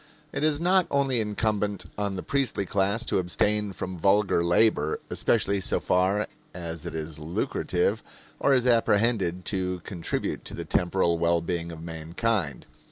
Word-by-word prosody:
It - - -2
is 155 -1 +2
not 180 +1 +3
only 135 -4 +2
incumbent 105 -3 -1
on 100 -1 -2
the 90 - -5
priestly 135 -8 0
class 100 +5 0
to - - +1
abstain 105 +3 +1
from 90 -1 -6
vulgar 100 -1 +3
labor, 85 -3 +2
especially 100 -3 +2
so - - 0
far 95 +3 +2 0.3
as 85 -3 -6
it - - -6
is 80 -1 -5
lucrative 90 +5 -1 0.4
or 140 - +4
is 125 -1 +2
apprehended 105 -6 +2
to 90 -2 -2
contribute 85 -5 -3
to - - -5
the - - -5
temporal 85 -1 +1
well 85 0 +3
being 85 0 -3
of 80 -1 -9
mankind. 85 +2 -2
95 Hz, 155 wpm, -26 LUFS, 85-110 Hz, 0.4 s, or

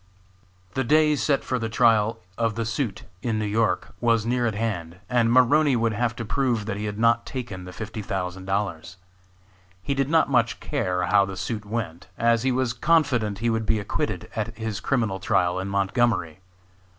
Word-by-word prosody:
The 130 - 0
day 150 +4 +4
set 140 0 +1
for 130 - -1
the 115 -1 -2
trial 115 -1 +3 0.2
of 115 -1 0
the 115 0 -2
suit 115 -2 -2 0.2
in 115 -3 -1
New 110 - -1
York 105 -2 0
was 115 -2 +2
near 120 0 +1
at 110 - -2
hand, 90 -7 -3
and 115 -1 +2
Maroney 135 +3 +5
would 115 -1 +1
have 120 +1 -1
to 115 - -5
prove 120 -3 0
that 105 - -3
he 105 +1 -4
had 105 -1 -4
not 115 +1 +3
taken 110 -8 -6
the 90 - -8
fifty 110 +3 -6
thousand 95 -2 -4
dollars. 95 -3 -3 0.9
He 140 - -1
did 135 0 0
not 160 0 +4
much 120 -4 +1
care 90 -1 -1
how 100 +2 +4
the 95 -1 -7
suit 105 +3 -4
went, 100 -6 -4
as 115 -1 +3
he 130 +1 +1
was 125 -1 0
confident 125 -7 +2
he 115 - +3
would 110 -1 -1
be 110 - +2
acquitted 100 - -3
at 110 0 -3
his 110 -2 -3
criminal 110 -8 0
trial 90 0 +1
in 95 - -3
Montgomery. 100 -3 0
115 Hz, 190 wpm, -25 LUFS, 100-120 Hz, 0.9 s, Maroney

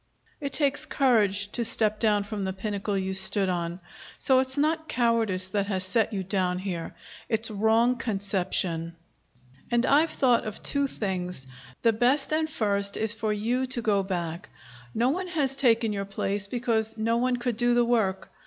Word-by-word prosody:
It 280 -2 -4
takes 285 -2 0
courage 205 -7 +2
to 240 - -1
step 215 -1 0
down 210 -3 +2
from 205 0 -5
the 190 0 -2
pinnacle 200 +1 -3
you 190 0 -2
stood 190 0 +2
on. 175 0 -2 0.4
So 260 -1 +3
it's 260 +1 -1
not 315 +2 0
cowardice 230 -7 +1
that 200 0 -1
has 190 -2 -1
set 220 +4 +1
you 195 -3 -2
down 185 -1 0
here. 180 -3 -5 0.3
It's 225 0 0
wrong 225 +4 +3
conception. 185 -6 -2 0.7
And 240 +1 +2
I've 300 +5 +4
thought 250 -5 +2
of 215 -1 -6
two 280 -1 +1
things. 180 - -3 0.4
The 230 - +4
first, 255 +7 +2
and 315 0 +1
best, 200 -2 0
is 220 0 +3
for 220 -1 -2
you 235 +5 0
to 255 -1 -3
go 205 -3 +2
back. 175 -2 -4 0.5
No 240 +3 +2
one 365 +6 -2
has 290 -7 0
taken 230 -5 +3
your 200 -1 -3
place, 200 0 -2
because 225 -1 -1
no 230 +1 +1
one 250 +1 +1
could 240 -1 -2
do 240 0 +2
the 240 0 +4
work. 220 -6 0
220 Hz, 175 wpm, -27 LUFS, 195-245 Hz, 0.7 s, I've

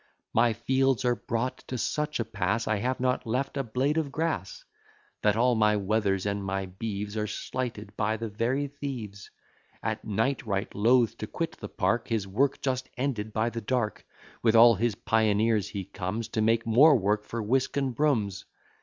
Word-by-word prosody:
My 115 0 +4
fields 130 +2 +1
are 125 - +4
brought 115 +3 -3
to 130 - -3
such 150 +6 -1
a 115 - 0
pass, 110 +1 -1
I 110 - +1
have 125 +5 -1
not 125 -1 0
left 130 +5 -1
a 140 - 0
blade 135 +6 0
of 145 -3 -3
grass; 150 - -3 0.6
That 105 -1 +3
all 125 +2 +3
my 105 -2 +3
wethers 100 -1 0
and 100 0 -1
my 95 0 -2
beeves 100 +2 -5
Are 105 -1 -1
slighted 110 -4 -5
by 110 +1 0
the 115 +1 -4
very 115 +7 -1
thieves. 130 -8 -6 0.5
At - - -2
night 115 +6 0
right 100 -3 -2
loath 115 +3 +3
to 110 - -4
quit 165 +6 -4
the - - -7
park, 115 +4 0
His 110 -5 -1
work 130 +9 +1
just 130 -1 -1
ended 120 -5 -2
by 110 +2 0
the 115 - -4
dark, 115 -1 -1 0.4
With 115 -1 +3
all 115 +1 +9
his 115 +1 0
pioneers 110 -1 +2
he 100 -2 -5
comes, 100 +3 -4
To 110 - -1
make 115 +1 +2
more 135 +7 +6
work 105 -1 +1
for 115 +1 -4
whisk 130 +6 0
and 135 -2 0
brooms. 110 -9 0
115 Hz, 185 wpm, -28 LUFS, 105-130 Hz, 0.6 s, all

